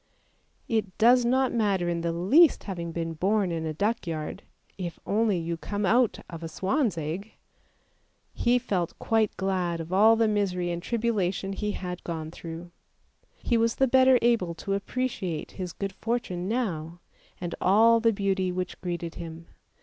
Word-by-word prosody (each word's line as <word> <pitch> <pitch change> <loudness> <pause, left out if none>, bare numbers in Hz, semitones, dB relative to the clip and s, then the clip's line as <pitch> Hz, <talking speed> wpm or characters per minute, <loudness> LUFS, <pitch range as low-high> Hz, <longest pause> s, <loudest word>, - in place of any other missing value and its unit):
It 210 -5 -1
does 245 +2 +5
not 260 +2 +2
matter 200 -6 +1
in 170 -1 -1
the 170 0 -1
least 250 - +4
having 170 -4 -5
been 165 0 -3
born 190 +3 +1
in 160 -1 -2
a 155 - -3
duckyard, 180 -4 -2 0.3
if 175 -3 -6
only 210 -2 +2
you 170 0 -3
come 205 +4 -3
out 235 +3 +3
of 165 -1 -8
a 165 - -4
swan's 200 - 0
egg! 165 +7 -4 1.0
He 240 +1 +2
felt 190 -9 -2
quite 220 -2 +1
glad 185 -3 -1
of 165 +2 -6
all 215 +4 +6
the 225 0 +3
misery 185 -4 0
and 170 0 -3
tribulation 200 -4 -1
he 210 +1 -2
had 180 -1 -5
gone 160 -2 -5
through; 170 +1 -8 0.7
he 235 - +2
was 230 0 +2
the 270 - +3
better 260 0 +6
able 220 -8 +2
to 195 +4 -3
appreciate 195 -6 -3
his 180 -2 -5
good 195 +2 -5
fortune 190 -6 -3
now, 175 -8 -2 0.4
and 175 -1 -4
all 225 +4 +5
the 230 0 +3
beauty 195 -3 0
which 180 0 -4
greeted 170 -2 -4
him. 165 0 -9
190 Hz, 165 wpm, -27 LUFS, 170-225 Hz, 1.0 s, all